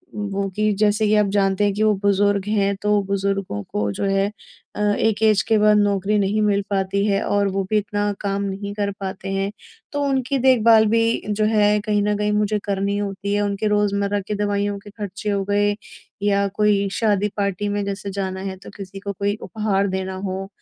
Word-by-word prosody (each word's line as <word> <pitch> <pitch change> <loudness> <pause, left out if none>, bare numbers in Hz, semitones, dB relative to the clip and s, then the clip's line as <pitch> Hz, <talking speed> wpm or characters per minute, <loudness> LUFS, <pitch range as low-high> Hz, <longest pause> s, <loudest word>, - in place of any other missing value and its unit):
वो 200 -1 -2
कि 215 0 +2
जैसे 210 0 +3
कि, 210 - +2
आप 210 -1 +3
जानते 195 0 +2
हैं 205 -1 +2
कि 210 +2 0
वो 215 -1 +4
बुजुर्ग 200 0 +2
हैं, 200 -2 +1
तो 210 0 +2
बुज़ुर्गों 195 - -2
को 105 +1 -2
जो 100 - -4
है 195 +1 +1 0.5
अ, - - -2 0.2
एक 220 -1 +1
ऐज़ 215 -2 +4
के 225 - +4
बाद 210 0 +5
नौकरी 205 0 +2
नहीं 205 +2 +1
मिल 205 -1 +2
पाती 195 0 0
है 200 -1 +1
और 205 0 +1
वो 195 0 -1
भी 215 - +2
इतना 205 0 -1
काम 200 -1 -1
नहीं 200 +1 -4
कर 205 -1 -1
पाते 195 0 -5
हैं। 195 +1 -1 0.4
तो 290 - -2
उनकी 275 -1 0
देखभाल 230 -4 +5
भी 230 0 +2
जो 210 +1 +1
है 210 -1 +3
कहीं 210 -1 +1
न 210 0 +1
कहीं 210 0 0
मुझे 210 0 +1
करनी 200 0 -1
होती 200 0 -3
है, 205 - +1
उनके 205 +1 -1
रोज़मर्रा 205 0 +1
की - - -2
दवाइयों 205 0 -1
के 205 - -13
ख़र्चे 205 0 -5
हो 200 -1 0
गए 205 0 +2 0.5
या 200 -1 +2
कोई 205 -1 +3
शादी, 210 -1 +1
पार्टी 200 0 -1
में 205 0 -1
जैसे 200 0 -4
जाना 190 -1 -3
है 190 - -7
तो - - -10
किसी 195 -1 -8
को 200 0 -5
कोई 200 +2 -1
उपहार 205 -3 -1
देना 190 0 -3
हो, 190 0 -4
205 Hz, 205 wpm, -21 LUFS, 195-210 Hz, 0.5 s, बाद